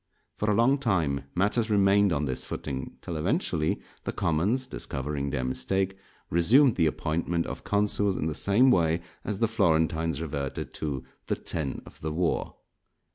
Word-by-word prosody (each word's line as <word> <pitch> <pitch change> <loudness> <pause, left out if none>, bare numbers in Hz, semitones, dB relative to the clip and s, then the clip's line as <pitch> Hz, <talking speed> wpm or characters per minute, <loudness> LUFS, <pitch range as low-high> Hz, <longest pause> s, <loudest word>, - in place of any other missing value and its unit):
For 105 - -1
a 105 - +3
long 130 +5 +4
time 80 - 0
matters 105 +5 +1
remained 100 -1 +4
on 75 -2 0
this 65 -2 -2
footing; 65 -1 -5
till 85 - -5
eventually, 85 - 0 0.2
the - - -2
commons, 100 +12 +1
discovering 70 - -4
their 70 -2 -2
mistake, 80 +10 0 0.4
resumed 115 - +5
the 80 - +3
appointment 85 +2 -1
of - - -6
consuls 105 -1 +1
in - - -1
the 80 - -1
same 110 - +4
way 85 -4 +2 0.2
as 105 - -3
the 115 - +2
Florentines 80 - +1
reverted 70 -4 -4
to 70 -4 -3 0.2
"the - - +1
Ten 75 -5 -4
of - - -15
the 80 - -2
War." 85 +2 -1
85 Hz, 160 wpm, -27 LUFS, 75-105 Hz, 0.4 s, resumed